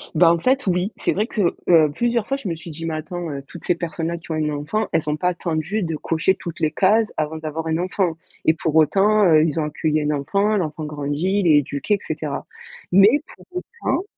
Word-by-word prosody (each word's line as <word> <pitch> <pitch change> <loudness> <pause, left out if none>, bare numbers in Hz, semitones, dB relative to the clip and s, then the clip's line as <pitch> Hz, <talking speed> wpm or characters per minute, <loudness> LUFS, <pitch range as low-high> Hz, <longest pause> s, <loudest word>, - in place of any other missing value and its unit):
Bah, 165 +1 +6
en 170 - +1
fait 255 +3 +1
oui. 180 +3 +1
C'est - - 0
vrai 210 +3 0
que, 200 -8 0
heu, 160 -4 +5
plusieurs 235 0 0
fois, 275 - 0
je 255 - -7
me 170 - -2
suis 165 +2 -10
dit: 165 +2 -7
«Mais 165 -1 -2
attends, 165 +2 -5
heu, 140 -1 -6
toutes 175 - -11
ces 175 - +2
personnes-là 170 0 -3
qui 165 0 -10
ont - - 0
un 155 -1 0
enfant 150 +9 -2
elles 155 - 0
ont 150 - +1
pas 180 - +1
attendu 175 +3 -2
de 165 -2 -2
cocher 165 +4 +1
toutes 170 -2 -8
les 155 -2 +1
cases 215 +3 +3
avant 155 +1 -2
d'avoir 160 +1 -4
un 160 - 0
enfant 180 -1 -1 0.3
et 160 - +5
pour 160 -1 -2
autant, 200 +7 +4
heu, 155 -3 +6
ils 160 -1 0
ont 155 - 0
accueilli 155 +1 -1
un 150 0 0
enfant, 200 +9 +1
l'enfant 155 -3 -3
grandit, 150 +6 -1
il 190 - +1
est 155 -2 +6
éduqué 140 +8 -1
et 200 - -6
cetera». 150 -2 -4 0.5
Mais 200 +10 +6
pour - - -18
autant 365 +1 -3
165 Hz, 235 wpm, -21 LUFS, 155-195 Hz, 0.5 s, Bah